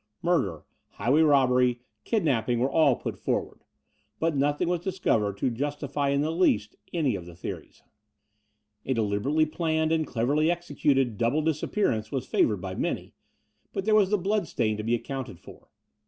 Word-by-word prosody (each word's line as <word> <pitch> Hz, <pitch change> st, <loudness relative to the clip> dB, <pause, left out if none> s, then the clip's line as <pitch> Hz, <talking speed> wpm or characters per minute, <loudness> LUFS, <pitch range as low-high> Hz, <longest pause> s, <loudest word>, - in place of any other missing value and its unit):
Murder, 135 Hz, -, 0 dB, 0.3 s
highway 140 Hz, +6 st, +2 dB
robbery, 125 Hz, -5 st, +3 dB, 0.2 s
kidnapping 135 Hz, -, +1 dB
were 130 Hz, +3 st, +1 dB
all 150 Hz, -6 st, +4 dB
put -, -, -6 dB
forward; -, -, -2 dB, 0.6 s
but 165 Hz, -1 st, +1 dB
nothing 145 Hz, +3 st, +1 dB
was 175 Hz, 0 st, +1 dB
discovered 140 Hz, -, 0 dB
to 125 Hz, -, 0 dB
justify 145 Hz, +2 st, -2 dB
in 140 Hz, 0 st, +2 dB
the 155 Hz, +2 st, 0 dB
least 165 Hz, -, +1 dB, 0.2 s
any 150 Hz, -, +1 dB
of 90 Hz, -3 st, -7 dB
the 85 Hz, -, -11 dB
theories. 90 Hz, -, -8 dB, 1.0 s
A 130 Hz, -, -1 dB
de 115 Hz, -, +1 dB
liberately 130 Hz, +10 st, +1 dB
planned 160 Hz, 0 st, 0 dB
and 160 Hz, -1 st, +1 dB
cleverly 140 Hz, +7 st, +1 dB
executed 145 Hz, -8 st, 0 dB
double 125 Hz, +7 st, +1 dB
disappearance 150 Hz, -, 0 dB
was 135 Hz, -3 st, -2 dB
favoured 105 Hz, -5 st, +1 dB
by 95 Hz, 0 st, -5 dB
many: -, -, -3 dB, 0.6 s
but 195 Hz, -1 st, -3 dB
there 215 Hz, -, +3 dB
was 205 Hz, -3 st, +5 dB
the 210 Hz, -, +2 dB
bloodstain 185 Hz, -, 0 dB
to -, -, -3 dB
be 115 Hz, +2 st, +1 dB
accotmted 125 Hz, -5 st, -6 dB
for. -, -, -15 dB
140 Hz, 160 wpm, -27 LUFS, 115-160 Hz, 1.0 s, was